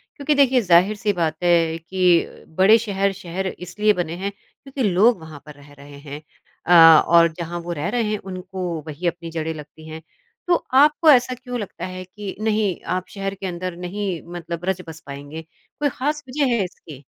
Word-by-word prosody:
क्योंकि 290 +1 0
देखिए, 265 -3 +4
ज़ाहिर-सी 195 +3 +3
बात 160 -3 -1
है 165 -2 +3
कि 175 +1 0
बड़े 205 +4 +6
शहर, 200 -3 -1
शहर 190 0 -5
इसलिए 205 +4 0
बने 170 -2 -3
हैं 200 +2 -3
क्योंकि 265 +6 -8
लोग 200 +4 +4
वहाँ 160 -2 -11
पर 150 - -11
रह 145 0 -17
रहे 145 0 -13
हैं। 145 +1 -9 0.4
अ, 165 -2 +8
और 170 0 +6
जहाँ 175 +1 -5
वो 175 +1 -6
रह 150 -2 -3
रहे 240 -2 0
हैं 210 - 0
उनको 185 0 -7 0.2
वही 155 +4 -4
अपनी 170 0 -4
जड़ें 160 0 -3
लगती 155 +1 -12
हैं। 160 0 -8 0.5
तो 350 - +4 0.2
आपको 300 +3 +5
ऐसा 250 -1 +4
क्यों 250 -1 -6
लगता 205 - -6
है 185 0 -7
कि 200 +1 -8
नहीं, 215 -4 0
आप 185 +1 -3
शहर 195 -1 -4
के 195 - -8
अंदर 180 0 -5
नहीं 180 -1 -4
मतलब 170 0 -6
रच 190 -1 -1
बस 160 0 -9
पाएँगे? 145 +3 -8 0.4
कोई 290 -1 +1
खास 295 +3 -3
वजह 275 -2 +1
है 210 - +1
इसकी? 155 -6 -10
185 Hz, 190 wpm, -21 LUFS, 165-210 Hz, 0.5 s, अ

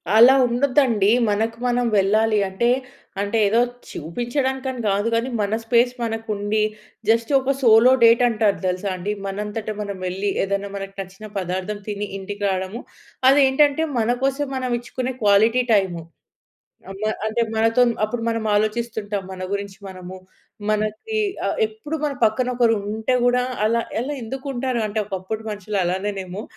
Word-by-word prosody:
అలా 240 +4 +8
ఉండొద్దండి. 245 -4 +2 0.2
మనకు 225 +2 0
మనం 245 0 +1
వెళ్ళాలి. 215 +2 +2
అంటే 215 +6 0 0.5
అంటే 205 +3 -1
ఏదో 215 +3 +3 0.3
చూపించడానికని 260 - -3
గాదు 205 +3 +1
గానీ, 230 +3 0
మన 205 0 0
స్పేస్ 240 +2 +3
మనకుండి, 220 -2 -2 0.5
జస్ట్ 230 +3 +2
ఒక 270 +1 +1
సోలో 230 0 +6
డేటంటారు 230 -3 +4
తెలుసా 185 +2 -1
అండి? 185 +3 -3
మనంతట 210 +2 -4
మనం 200 -1 -4
వెళ్ళి, 190 +3 -2
ఏదన్నా 200 +1 -2
మనకి 195 0 -6
నచ్చిన 195 +3 -8
పదార్థం 190 +3 -3
తిని, 205 0 -3
ఇంటికి 205 +1 -6
రాడము. 190 +4 -3 0.5
అదేంటంటే 285 +2 +4
మన 225 0 +1
కోసం 275 +2 0
మనమిచ్చుకునే 255 0 -3
క్వాలిటీ 220 +5 +4
టైము. 185 -5 +1 0.9
అమ్మ 195 +2 -9 0.2
అంటే, 225 +2 0
మనతోన్ 230 +2 +3
అప్పుడు 230 +2 -3
మనం 225 -1 -2
ఆలోచిస్తుంటాం 215 -1 -1
మన 185 0 -7
గురించి 200 -1 -4
మనము. 185 0 -9 0.5
మనకి 215 - -1 0.3
ఆహ్, - - -2
ఎప్పుడు 430 -8 -6
మన 290 -2 -1
పక్కన 225 +3 +1
ఒకరుంటే 220 0 +1
గూడా, 245 0 +3 0.2
అలా 230 +2 +2 0.2
అలా 265 +5 -3
ఎందుకుంటారు? 260 0 -3
అంటే, 215 +1 -2
ఒకప్పుడు 195 +2 -4
మనుషులలానేనేమో. 195 -1 -3
220 Hz, 130 wpm, -22 LUFS, 200-245 Hz, 0.9 s, అలా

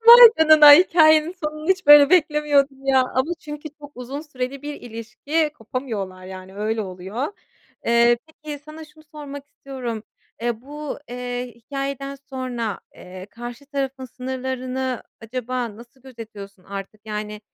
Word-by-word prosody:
Vay 475 0 +12
canına. 310 -2 +9
Hikâyenin 315 0 +5
sonunu 305 +2 -4
hiç 380 0 +1
böyle 290 0 +9
beklemiyordum 290 -5 +2
ya 265 -1 +5
ama 260 +5 -1
çünkü 295 0 -8
çok 290 0 -11
uzun 255 +4 -6
süreli 275 -2 -6
bir 295 0 -6
ilişki, 245 +7 -2
kopamıyorlar, 215 -6 -5
yani, 185 0 -10
öyle 220 +2 -1
oluyor. 190 +7 -5 0.6
Eee, 235 0 +4
peki, 305 -2 -9
sana 310 +1 -10
şunu 310 0 -20
sormak 285 -2 -8
istiyorum. 250 -6 -6 0.4
Eee, 235 -2 -1
bu, 295 +3 -7
eee, 245 0 -5
hikâyeden 275 +3 -5 0.2
sonra, 245 -5 -4
eee, 185 +1 -11
karşı 240 +4 -9
tarafın 275 -2 -4
sınırlarını 255 0 -4 0.2
acaba 245 -1 -4
nasıl 240 +3 -16
gözetiyorsun? 215 -7 -11
Artık, 200 +2 -8
yani, 210 0 -5
260 Hz, 135 wpm, -22 LUFS, 230-295 Hz, 0.6 s, Vay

